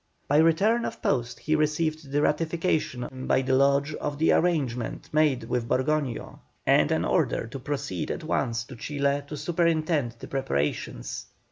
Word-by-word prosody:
By 145 - +3
return 195 +9 +4
of - - -4
post 120 -3 0
he 155 - +1
received 155 -1 0
the 145 +1 +2
ratification 150 -5 -1
by 130 - +3
the 130 0 0
Lodge 140 +2 +3
of 145 -1 -4
the 160 - +3
arrangement 135 -9 0
made 150 -4 +3
with 120 -2 -2
Borgoño, 140 -2 -1 0.3
and - - +4
an - - +1
order - - +1
to 125 +4 -7
proceed 135 - -3
at - - -4
once 115 0 -1
to 125 +2 -11
Chile 140 +3 -1
to 150 - -6
superintend 155 -4 +1
the - - -9
preparations. 75 - -2
145 Hz, 155 wpm, -27 LUFS, 130-155 Hz, 0.3 s, return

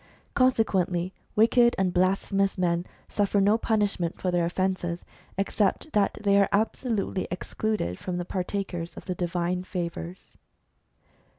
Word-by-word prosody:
Consequently, 190 -8 +2 0.2
wicked 235 +2 +5
and 185 -2 +1
blasphemous 195 +2 +1
men 175 -1 0 0.2
suffer 205 0 +1
no 200 +2 +4
punishment 205 -7 0
for 185 - 0
their 175 -1 +2
offences, 175 -1 -1 0.3
except 200 +8 0
that 205 -1 +2
they 200 0 +5
are 200 - +2
absolutely 215 -2 0
excluded 180 - -2
from 180 - -4
being 175 0 -3
partakers 180 -2 -3
of - - -9
the 185 - -2
divine 175 +1 -1
favours. 175 -1 -6
190 Hz, 125 wpm, -27 LUFS, 175-205 Hz, 0.3 s, wicked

